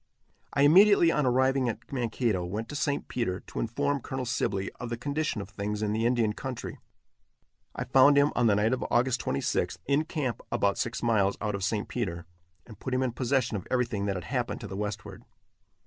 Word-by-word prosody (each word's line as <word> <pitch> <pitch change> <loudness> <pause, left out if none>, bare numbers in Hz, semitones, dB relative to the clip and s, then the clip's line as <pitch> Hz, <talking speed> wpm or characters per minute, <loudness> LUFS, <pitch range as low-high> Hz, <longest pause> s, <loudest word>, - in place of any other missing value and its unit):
I 140 - +2
immediately, 175 +2 +7
on 150 -4 +1
arriving 130 0 +2
at 115 - -7
Mankato, 115 -6 0
went 105 +6 -4
to - - -6
St. 145 0 -1
Peter, 95 -7 -2
to - - -7
inform 140 +5 -1
Colonel 130 +1 -4
Sibley 100 -5 -1
of 120 - -5
the 120 - -3
condition 145 -3 -2
of 100 - -9
things 105 +1 -3
in 105 0 0
the 115 +2 +1
Indian 120 -3 +1
country. 130 +1 -6 1.0
I - - -2
found 140 +2 +5
him, 140 +1 +4
on 120 - +3
the 105 - +4
night 105 +4 +2
of 130 - -2
August 125 +1 +2
26th, 70 - -1
in 140 +3 +2
camp 140 -7 -3
about 100 -1 +1
six 115 +1 -2
miles 100 -4 +2
out 105 0 -2
of 100 -1 -3
St. 105 +1 -1
Peter, 85 -9 -3 0.4
and 110 -4 -13
put 130 - -3
him 130 - +1
in 130 - 0
possession 125 -1 0
of 95 - -8
everything 120 -5 0
that 100 - -1
had 90 - -4
happened - - -2
to - - -6
the - - -7
westward. 105 +1 -5
120 Hz, 205 wpm, -28 LUFS, 105-135 Hz, 1.0 s, immediately